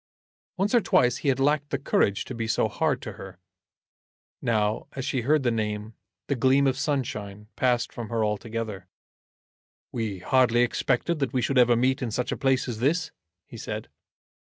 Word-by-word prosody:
Once 195 Hz, +4 st, 0 dB
or 240 Hz, -, +5 dB
twice 125 Hz, -, +3 dB
he -, -, -5 dB
had 135 Hz, -1 st, +2 dB
lacked 145 Hz, +1 st, +2 dB
the 140 Hz, -, -1 dB
courage 100 Hz, -6 st, +1 dB
to -, -, -6 dB
be 115 Hz, -2 st, -3 dB
so 110 Hz, -, +2 dB
hard 135 Hz, +4 st, -1 dB
to 110 Hz, -, -5 dB
her. 95 Hz, -2 st, -10 dB, 1.0 s
Now 110 Hz, -2 st, 0 dB
as 135 Hz, -1 st, -4 dB
she 130 Hz, -2 st, -1 dB
heard 145 Hz, +4 st, +2 dB
the 120 Hz, -, +2 dB
name 105 Hz, -1 st, -3 dB, 0.3 s
the -, -, +1 dB
gleam 135 Hz, +2 st, +3 dB
of 135 Hz, -1 st, +2 dB
sunshine 105 Hz, -8 st, -3 dB
passed 125 Hz, -2 st, +1 dB
from 115 Hz, -3 st, -6 dB
her 115 Hz, -2 st, 0 dB
altogether. 105 Hz, -2 st, -4 dB, 1.0 s
"We 110 Hz, -5 st, -3 dB
hardly 120 Hz, +3 st, +3 dB
expected 160 Hz, +6 st, 0 dB
that 135 Hz, -4 st, -1 dB
we 130 Hz, -, +1 dB
should 130 Hz, +1 st, +2 dB
ever 120 Hz, -1 st, +5 dB
meet 130 Hz, +3 st, +1 dB
in 125 Hz, -, -1 dB
such 120 Hz, +3 st, -2 dB
a -, -, 0 dB
place 135 Hz, -1 st, +1 dB
as 115 Hz, -3 st, -4 dB
this?" 160 Hz, +7 st, +1 dB, 0.3 s
he -, -, -11 dB
said. -, -, -5 dB
125 Hz, 180 wpm, -26 LUFS, 110-135 Hz, 1.0 s, or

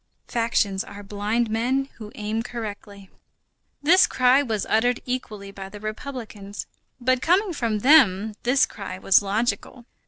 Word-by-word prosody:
Factions 220 Hz, -4 st, 0 dB
are 205 Hz, 0 st, -10 dB
blind 210 Hz, +4 st, -1 dB
men 255 Hz, +5 st, 0 dB
who 215 Hz, -1 st, -9 dB
aim 215 Hz, +1 st, -2 dB
correctly. 205 Hz, -4 st, -8 dB, 0.7 s
This 370 Hz, +6 st, +6 dB
cry 255 Hz, +2 st, +4 dB
was 220 Hz, -7 st, -2 dB
uttered 245 Hz, +3 st, +2 dB
equally 215 Hz, -6 st, -5 dB
by 195 Hz, -1 st, -8 dB
the 205 Hz, +1 st, -10 dB
republicans. 215 Hz, -2 st, -7 dB, 0.3 s
But 255 Hz, 0 st, +1 dB
coming 365 Hz, +4 st, +2 dB
from 225 Hz, -7 st, -1 dB
them, 220 Hz, -7 st, +5 dB
this 255 Hz, +3 st, +3 dB
cry 200 Hz, -3 st, -8 dB
was 190 Hz, +1 st, +4 dB
logical. 220 Hz, +4 st, -2 dB
220 Hz, 135 wpm, -24 LUFS, 205-250 Hz, 0.7 s, This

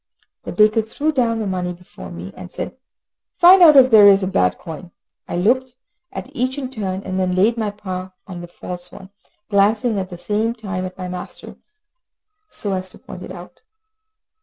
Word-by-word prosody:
The -, -, -5 dB
baker 215 Hz, +1 st, +4 dB
threw 285 Hz, +8 st, -2 dB
down 240 Hz, -5 st, +1 dB
the 220 Hz, -, -2 dB
money 180 Hz, -2 st, -2 dB
before 175 Hz, -, -12 dB
me, 85 Hz, +3 st, -8 dB
and 90 Hz, -, -9 dB
said, -, -, -6 dB, 0.6 s
"Find 365 Hz, +2 st, +8 dB
out 315 Hz, -4 st, +9 dB
if 260 Hz, -1 st, +7 dB
there 210 Hz, -2 st, +9 dB
is 195 Hz, -1 st, +6 dB
a -, -, 0 dB
bad 90 Hz, -, +1 dB
coin." 170 Hz, +1 st, -9 dB, 0.4 s
I -, -, -3 dB
looked 250 Hz, +7 st, +1 dB, 0.4 s
at 275 Hz, +3 st, -8 dB
each 255 Hz, +1 st, -1 dB
in 260 Hz, -2 st, -5 dB
turn, 195 Hz, -5 st, -4 dB
and 185 Hz, 0 st, -3 dB
then 180 Hz, -1 st, 0 dB
laid 210 Hz, +5 st, +3 dB
my 220 Hz, -3 st, -1 dB
paw 185 Hz, -2 st, -6 dB
on 180 Hz, -3 st, -8 dB
the 175 Hz, -, -8 dB
false 175 Hz, +1 st, -9 dB
one, 190 Hz, 0 st, -12 dB, 0.4 s
glancing 210 Hz, +2 st, +2 dB
at 185 Hz, -1 st, -4 dB
the 175 Hz, -, -8 dB
same 215 Hz, +5 st, -1 dB
time 195 Hz, -5 st, -4 dB
at 185 Hz, -, -8 dB
my 185 Hz, -1 st, -5 dB
master, 180 Hz, 0 st, -8 dB, 0.9 s
so 200 Hz, -2 st, -3 dB
as 185 Hz, 0 st, -2 dB
to -, -, -9 dB
point 180 Hz, -, -11 dB
it -, -, -8 dB
out. 180 Hz, -1 st, -11 dB
195 Hz, 195 wpm, -20 LUFS, 180-230 Hz, 0.9 s, out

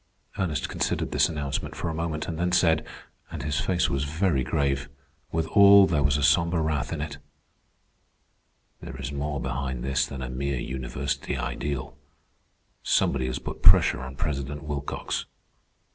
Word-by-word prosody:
Ernest 85 Hz, -6 st, -1 dB
considered -, -, -2 dB
this -, -, +3 dB
announcement 75 Hz, -3 st, -3 dB
for -, -, -3 dB
a 80 Hz, -, -2 dB
moment, 80 Hz, -1 st, -3 dB
and 80 Hz, -1 st, -4 dB
then 90 Hz, +1 st, +1 dB
said, 85 Hz, -3 st, +3 dB, 0.5 s
and -, -, -6 dB
his 75 Hz, 0 st, -1 dB
face 90 Hz, -2 st, +1 dB
was 70 Hz, 0 st, -1 dB
very 80 Hz, -1 st, 0 dB
grave, 70 Hz, +1 st, 0 dB, 0.4 s
withal 100 Hz, +5 st, +6 dB
there 80 Hz, -6 st, +1 dB
was 70 Hz, 0 st, +2 dB
a 75 Hz, -, -1 dB
sombre 85 Hz, +5 st, +3 dB
wrath 80 Hz, -4 st, -1 dB
in 80 Hz, -3 st, -3 dB
it: 75 Hz, 0 st, -5 dB, 1.6 s
"There 65 Hz, -, -8 dB
is 65 Hz, +1 st, -5 dB
more 70 Hz, 0 st, -3 dB
behind 65 Hz, -1 st, -3 dB
this 70 Hz, 0 st, +1 dB
than 65 Hz, -2 st, -6 dB
a -, -, -4 dB
mere 70 Hz, +1 st, -2 dB
university 65 Hz, +2 st, -3 dB
ideal. 70 Hz, -2 st, -4 dB, 0.9 s
Somebody 65 Hz, -2 st, +1 dB
has 65 Hz, 0 st, -2 dB
put -, -, -7 dB
pressure -, -, +6 dB
on 65 Hz, +1 st, -7 dB
President 70 Hz, +1 st, -3 dB
Wilcox." 75 Hz, -2 st, -4 dB
70 Hz, 155 wpm, -26 LUFS, 65-80 Hz, 1.6 s, withal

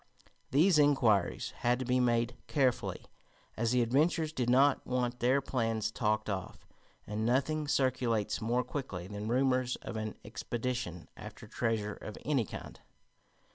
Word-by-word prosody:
These 155 Hz, +4 st, +4 dB
inquiries 125 Hz, -10 st, +3 dB
had 120 Hz, +1 st, +2 dB
to 130 Hz, -, -4 dB
be 125 Hz, +1 st, +2 dB
made 120 Hz, -1 st, +1 dB
carefully, 130 Hz, -5 st, 0 dB, 0.5 s
as 115 Hz, +1 st, 0 dB
the 125 Hz, -1 st, +3 dB
adventurers 155 Hz, +6 st, +1 dB
did 125 Hz, -5 st, -1 dB
not 135 Hz, +3 st, +4 dB
want 125 Hz, -1 st, -1 dB
their 130 Hz, +3 st, +3 dB
plans 115 Hz, -5 st, -1 dB
talked 110 Hz, -2 st, 0 dB
of, 95 Hz, -3 st, -5 dB, 0.4 s
and 105 Hz, +1 st, -3 dB
nothing 140 Hz, +6 st, +1 dB
circulates 125 Hz, -6 st, +1 dB
more 120 Hz, +3 st, +1 dB
quickly 115 Hz, -13 st, -5 dB
than 105 Hz, +2 st, -6 dB
rumors 130 Hz, +1 st, +2 dB
of 115 Hz, -, -7 dB
an 110 Hz, -1 st, -4 dB
expedition 120 Hz, -9 st, -4 dB
after -, -, -10 dB
treasure 110 Hz, -2 st, -1 dB
of 105 Hz, -, -9 dB
any 135 Hz, -5 st, +2 dB
kind. -, -, -9 dB
125 Hz, 140 wpm, -32 LUFS, 110-130 Hz, 0.5 s, These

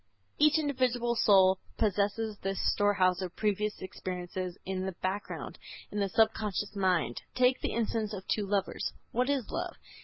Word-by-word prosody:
Each 300 Hz, +1 st, +6 dB
individual 255 Hz, -5 st, +1 dB
soul 190 Hz, -4 st, +5 dB, 0.2 s
possesses 210 Hz, +1 st, 0 dB
this 195 Hz, 0 st, -2 dB
storehouse 190 Hz, -3 st, +3 dB
of 185 Hz, -1 st, -5 dB
previous 210 Hz, -1 st, -1 dB
experiences 180 Hz, 0 st, -5 dB
in 190 Hz, 0 st, -2 dB
the 190 Hz, -, -3 dB
background, 190 Hz, +3 st, -4 dB, 0.3 s
in 210 Hz, -, -2 dB
the 200 Hz, -1 st, +1 dB
subconscious 210 Hz, -1 st, +1 dB
mind. 180 Hz, -11 st, +1 dB
Take 255 Hz, 0 st, +3 dB
the -, -, -1 dB
instance 225 Hz, -2 st, -1 dB
of 195 Hz, -3 st, -7 dB
two 210 Hz, -2 st, 0 dB
lovers. 200 Hz, -1 st, -1 dB, 0.2 s
What 250 Hz, +3 st, +1 dB
is 275 Hz, -6 st, 0 dB
love? -, -, -3 dB
205 Hz, 150 wpm, -30 LUFS, 190-225 Hz, 0.3 s, Each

